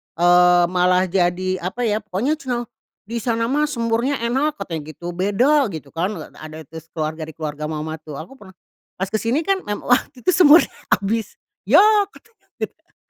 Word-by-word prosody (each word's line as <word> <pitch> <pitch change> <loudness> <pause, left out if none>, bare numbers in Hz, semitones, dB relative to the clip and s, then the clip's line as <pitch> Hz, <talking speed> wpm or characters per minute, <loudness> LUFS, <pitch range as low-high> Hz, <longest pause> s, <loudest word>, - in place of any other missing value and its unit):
Eee, 175 +1 +5
malah 180 0 +3
jadi, 185 0 0
apa 190 +8 -4
ya, 215 -1 +1
pokoknya 210 +8 -1
ceunah, 245 -4 -3 0.4
"Di 230 +3 -4
sana 230 +1 -1
mah 300 +2 +2
semurnya 235 0 0
enak," 270 +6 0
katanya 165 - -5
gitu, 175 0 -6
"beda." 235 - +2
Gitu 155 -8 -8
kan. 185 +6 -2
Eee, - - -9
ada 155 0 -9
terus 160 +2 -11
keluarga 155 0 -3
di 160 - -11
keluarga 150 -1 -4
mamah 155 0 -5
tuh 155 -2 -10
aku 175 - -10
pernah 190 -2 -15 0.4
pas 190 - -1
kesini 230 +6 0
kan 390 -1 +2
mem 205 0 -2
waktu 250 +1 0
itu 370 - +3
semurnya 335 -2 +6 0.2
habis, 220 +3 0 0.3
"Yah!" 420 -1 +6
Katanya 455 0 -22 0.2
gitu - - -4
kan, - - -39
200 Hz, 180 wpm, -21 LUFS, 175-250 Hz, 0.4 s, semurnya